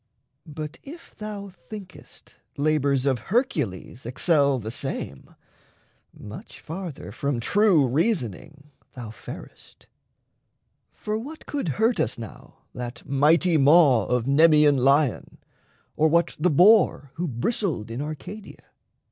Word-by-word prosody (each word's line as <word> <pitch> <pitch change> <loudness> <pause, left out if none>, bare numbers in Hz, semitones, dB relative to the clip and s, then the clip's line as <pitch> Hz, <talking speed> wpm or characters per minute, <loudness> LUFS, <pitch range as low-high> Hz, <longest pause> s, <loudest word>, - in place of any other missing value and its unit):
But 155 +1 -7
if 325 +5 -12
thou 210 -2 -7
thinkest 190 0 -13 0.2
Labours 140 -2 +1
of 130 -3 +1
Hercules 150 - -1
excel 140 +2 +2
the 110 -2 -6
same, 115 - -6 0.8
Much 105 0 -11
farther 165 - -7
from 135 +3 -2
true 190 - +3
reasoning 145 - -2 0.2
thou 120 -5 -8
farest. 115 - -12 1.1
For 215 +1 -4
what 300 +7 -9
could 280 - -3
hurt 225 +2 +2
us 120 - -1
now 115 -3 -12
that 125 -1 -7
mighty 160 +5 +3
maw 140 - +5
Of 125 -2 0
Nemeaean 150 0 +5
Lion, 135 -1 +1 0.6
or 155 - +3
what 170 +2 +1
the 180 +4 +3
Boar 180 -4 +4
Who 175 +1 -2
bristled 135 - -2
in 120 +4 -4
Arcadia? 155 +8 -8
150 Hz, 115 wpm, -24 LUFS, 130-185 Hz, 1.1 s, maw